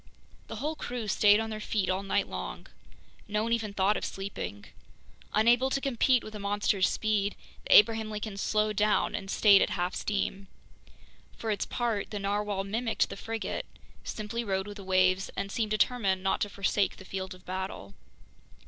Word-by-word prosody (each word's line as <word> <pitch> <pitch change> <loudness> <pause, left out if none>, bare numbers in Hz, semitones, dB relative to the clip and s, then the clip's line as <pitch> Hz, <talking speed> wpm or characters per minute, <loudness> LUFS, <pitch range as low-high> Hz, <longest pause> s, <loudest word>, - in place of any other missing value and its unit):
The - - -6
whole 305 +3 -2
crew 245 -6 -5
stayed 205 +1 +5
on 225 0 -3
their 215 - -4
feet 210 -2 -1
all 185 +1 0
night 195 - 0
long. - - -6 0.6
No 210 +1 0
one 230 +1 0
even 225 -3 -1
thought 200 +1 +2
of - - -5
sleeping. 195 - -5 0.7
Unable 240 +4 +4
to 275 - 0
compete 260 -2 +2
with 215 - -9
the 210 - -6
monster's 200 -1 +1
speed, 210 -2 0 0.3
the - - +5
Abraham 220 +1 +6
Lincoln 210 -1 -5
slowed 215 +1 0
down 210 0 +2
and 195 -1 -4
stayed 200 -1 +6
at - - +2
half 180 +1 -1
steam. 195 -1 -2 0.9
For 225 - -2
its 205 - -1
part, 230 -5 -1
the 210 - -4
narwhale 205 0 -1
mimicked 225 +4 0
the - - -5
frigate, 225 +2 -4 0.4
simply 220 +2 -4
rode 190 -3 -1
with 205 0 -8
the 200 - -9
waves, 185 0 +2
and 200 - -3
seemed 225 -2 -1
determined 210 -3 +1
not 190 - +1
to 205 - 0
forsake 200 0 0
the 190 - -12
field 190 0 -5
of 185 - -19
battle. 185 - -5
205 Hz, 180 wpm, -29 LUFS, 195-220 Hz, 0.9 s, Abraham